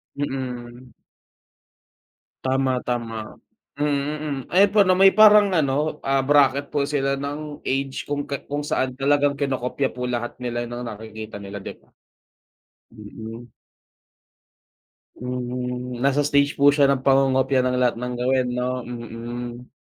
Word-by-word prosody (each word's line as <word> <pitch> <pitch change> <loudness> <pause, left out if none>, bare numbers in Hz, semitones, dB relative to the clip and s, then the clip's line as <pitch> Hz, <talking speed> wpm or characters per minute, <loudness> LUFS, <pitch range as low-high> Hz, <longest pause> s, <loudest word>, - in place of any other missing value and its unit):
Mm. 125 -3 -5 1.5
Tama, 130 -1 0
tama, 115 -2 -2 0.6
mm, 145 0 0
hmm. 145 -3 -3
Ayun 195 +3 +5
po, 215 - +4
na 185 - +5
may 195 0 +7
parang 210 -2 +7
ano, 150 0 0
ah, 135 0 +1
bracket 140 0 +3
po 140 -1 +1
sila 140 -2 0
ng 145 +1 -5
age 135 0 -2
kung 145 0 -2
ka 140 - -4
kung 145 +1 -2
saan 130 -3 -1
talagang 145 +1 +2
kinokopya 135 -1 -1
po 125 0 -4
lahat 120 -1 -3
nila 120 -1 -2
ng 120 +1 -6
nakikita 110 0 -8
nila, 100 0 -7
di - - -7
ba? - - -29 1.1
Mm. 110 +2 -9 1.7
Mhm, 125 0 -4
nasa 140 +1 +3
stage 140 0 +2
po 140 +1 +6
siya 145 -1 +4
ng 135 -1 +1
pangongopya 135 -1 +3
ng 125 0 0
lahat 125 -2 +2
ng 125 0 -3
gawin, 125 +1 +1
'no? 125 +1 -1 0.2
Mm. 120 +1 -7
130 Hz, 135 wpm, -23 LUFS, 120-145 Hz, 1.7 s, may